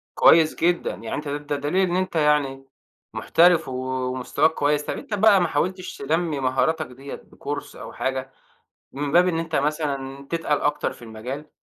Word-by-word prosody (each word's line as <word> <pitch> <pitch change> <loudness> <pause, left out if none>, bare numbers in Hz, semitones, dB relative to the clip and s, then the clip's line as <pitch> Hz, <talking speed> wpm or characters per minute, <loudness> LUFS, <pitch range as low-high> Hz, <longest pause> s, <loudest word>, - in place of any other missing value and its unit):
كويّس 160 -1 +6
جدًا 175 +1 +1
يعني - - -6
أنت 150 - -5
ده 145 +1 -3
دليل 175 +7 +1
إن 175 - -1
أنت 185 -1 -1
يعني، 150 -3 +1 0.5
محترف 170 -1 +4
ومستواك 130 +3 0
كويّس. 145 0 +1
طيّب - - -4
أنت - - -7
بقى 205 -1 +5
ما 175 - +2
حاولتش 180 +5 -2
تنمي 160 +1 -1
مهاراتك 135 +5 +1
ديّة 135 +2 -9
بكورس 145 0 -7
أو - - -9
حاجة 130 0 -3 0.6
من 140 +1 -3
باب 180 +2 +5
إن 165 -2 0
أنت 165 -1 -2
مثلًا 140 -2 -2
تتقل 165 -3 0
أكتر 145 - 0
في - - -16
المجال؟ 120 +7 -7
150 Hz, 165 wpm, -23 LUFS, 135-165 Hz, 0.6 s, كويّس